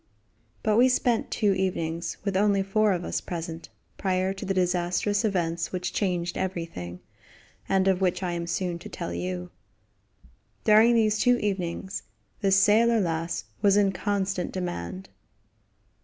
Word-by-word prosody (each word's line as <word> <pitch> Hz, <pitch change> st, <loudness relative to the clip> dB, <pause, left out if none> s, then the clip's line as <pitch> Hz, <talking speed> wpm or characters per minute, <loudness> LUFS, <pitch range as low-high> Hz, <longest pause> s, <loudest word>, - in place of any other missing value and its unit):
But 215 Hz, 0 st, +2 dB
we 250 Hz, +2 st, +6 dB
spent 245 Hz, -2 st, +1 dB
two 205 Hz, -2 st, +2 dB
evenings, 170 Hz, -3 st, -2 dB
with 200 Hz, -2 st, -2 dB
only 200 Hz, 0 st, +3 dB
four 210 Hz, +2 st, +2 dB
of 175 Hz, -2 st, -1 dB
us -, -, -2 dB
present, 165 Hz, -1 st, -6 dB, 0.3 s
prior 185 Hz, 0 st, 0 dB
to 195 Hz, -, -7 dB
the 195 Hz, -, 0 dB
disastrous 180 Hz, +3 st, +1 dB
events 170 Hz, -5 st, -1 dB
which 180 Hz, -1 st, -3 dB
changed 175 Hz, -3 st, -1 dB
everything, 165 Hz, -, -4 dB, 0.7 s
and 190 Hz, 0 st, +3 dB
of 190 Hz, -1 st, +2 dB
which 185 Hz, 0 st, +1 dB
I 180 Hz, -, -1 dB
am 170 Hz, 0 st, -3 dB
soon 175 Hz, -1 st, -2 dB
to -, -, -9 dB
tell 85 Hz, -, -5 dB
you. 90 Hz, 0 st, -4 dB, 1.1 s
During 220 Hz, +3 st, +6 dB
these 215 Hz, -2 st, +3 dB
two 245 Hz, +1 st, +4 dB
evenings 190 Hz, -2 st, -3 dB, 0.4 s
the 195 Hz, -2 st, +1 dB
"Sailor 215 Hz, +4 st, +5 dB
Lass" 165 Hz, -2 st, -1 dB, 0.2 s
was 200 Hz, -1 st, +4 dB
in 200 Hz, -1 st, +4 dB
constant 195 Hz, -1 st, -1 dB
demand. 95 Hz, -, -5 dB
190 Hz, 145 wpm, -26 LUFS, 170-205 Hz, 1.1 s, we